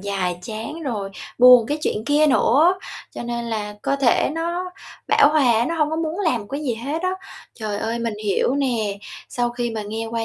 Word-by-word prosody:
dài 185 -3 -2
chán 225 - -6
rồi 210 -8 -3 0.3
buồn 250 -2 +8
cái 295 +1 -2
chuyện 215 - -1
kia 295 +1 +4
nữa, 300 +6 +4 0.4
cho - - -5
nên 235 0 -3
là 210 -2 -4
cơ 275 - 0
thể 265 0 +2
nó 345 +2 -3 0.4
bão 285 - +6
hòa 280 -6 +4
á, 230 +1 +2
nó 335 - -2
hông 300 -2 +1
có 315 - -2
muốn 325 +4 -2
làm 320 - +1
một 205 - -10
cái 280 +2 -3
gì 250 -5 -1
hết 285 +9 -4
á. 370 - +1 0.4
Trời 210 -3 -4
ơi, 230 +1 -2
mình 230 -2 -2
hiểu 205 +5 +1
nè, 230 -8 -1 0.3
sau 240 -1 -1
khi 240 -1 -3
mà 220 -1 -4
nghe 220 +2 -4
qua 225 0 -3
240 Hz, 215 wpm, -22 LUFS, 220-295 Hz, 0.4 s, buồn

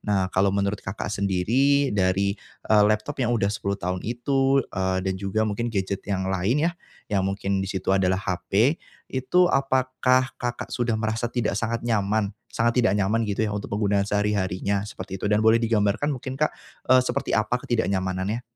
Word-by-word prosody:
Nah, 95 -3 0
kalau 95 +1 +3
menurut 100 +1 -1
Kakak 95 +2 -5
sendiri 115 +9 +2
dari, 100 0 +1 0.4
eee, 105 -1 +6
laptop 110 +7 -1
yang 120 -1 +1
udah 100 -2 +1
10 100 -2 -2
tahun 90 -1 -3
itu, 135 +3 +1
eee, 95 -1 -1
dan 95 -1 -1
juga 100 +2 0
mungkin 110 +3 -2
gadget 95 -1 -2
yang 95 -2 -1
lain 105 - +1
ya, 170 - +1 0.4
yang 100 - +3
mungkin 100 0 -1
di 95 - -3
situ 95 0 -1
adalah 95 -1 +2
HP, 100 - +1 0.4
itu 130 +8 +3
apakah 130 -1 +2
Kakak 120 0 -4
sudah 120 -2 0
merasa 110 +2 -1
tidak 120 -3 -1
sangat 115 +1 -2
nyaman 105 -2 0 0.2
sangat 115 +2 +1
tidak 105 -3 +2
nyaman 105 +4 +1
gitu 110 +2 0
ya 105 - -3
untuk 105 - -5
penggunaan 100 -1 +1
sehari-harinya 100 -1 0
seperti 95 -2 -8
itu, 105 - -1
dan 105 - +3
boleh 110 +2 +4
digambarkan 110 +4 +1
mungkin 130 -1 -4
Kak, 150 +3 +1 0.4
eee, 130 - +8
seperti - - -2
apa 110 +2 +1
ketidaknyamanannya? 100 -1 -1
105 Hz, 175 wpm, -24 LUFS, 100-120 Hz, 0.4 s, eee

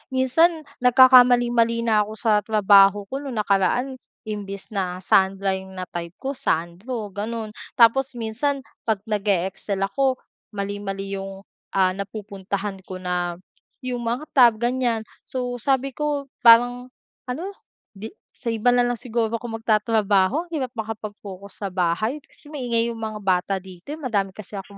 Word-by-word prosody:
Minsan 315 +6 +3 0.2
nagkakamali-mali 245 -2 +5
na 220 -2 +3
ako 215 - -7
sa 215 -1 +2
trabaho 205 -1 +5
ko, 270 - -2
no'ng 275 -3 -6
nakaraan 210 +6 +1 0.2
imbes 205 -2 -6
na 185 -2 -3
Sandra 195 +1 +2
'yong 190 0 -12
na-type 175 -2 -6
ko 270 - -4
Sandro 205 - -3
gano'n. 215 +2 -4 0.2
Tapos, 250 +2 +4
minsan 245 +5 -2 0.2
'pag 215 -3 0
nag-e-excel 200 -2 -1
ako 260 +7 +1 0.4
mali-mali 195 -1 -4
'yong, 195 0 -8 0.3
ah, 185 -1 +4
napupuntahan 200 0 -5
ko 185 - -6
na 180 -1 -2 0.5
'yong 250 -1 -3
mga 235 +4 -2
tab, 245 -4 +6
ganyan. 240 -1 0 0.2
So, 245 -1 -3
sabi 270 +2 0
ko 285 0 -3
parang 245 +2 +6 0.4
ano, 330 +11 -4 0.4
'di 215 +3 -8 0.2
sa - - -12
iba 225 +2 +2
na 245 0 +3
lang 245 0 0
siguro 230 -2 -1
ako 230 -1 -5
magtatrabaho, 215 - +2
hirap 270 -5 -2
makapag-focus 205 -3 -7
sa - - 0
bahay 190 - 0
kasi 295 +1 -18
maingay 235 -4 0
'yong 230 - -8
mga 215 -1 -4
bata 185 +1 +1
dito, 190 - -9
eh. - - -14
Madami 205 -9 -1
kasi 215 -1 -11
akong 200 +1 -12
220 Hz, 145 wpm, -23 LUFS, 195-245 Hz, 0.5 s, tab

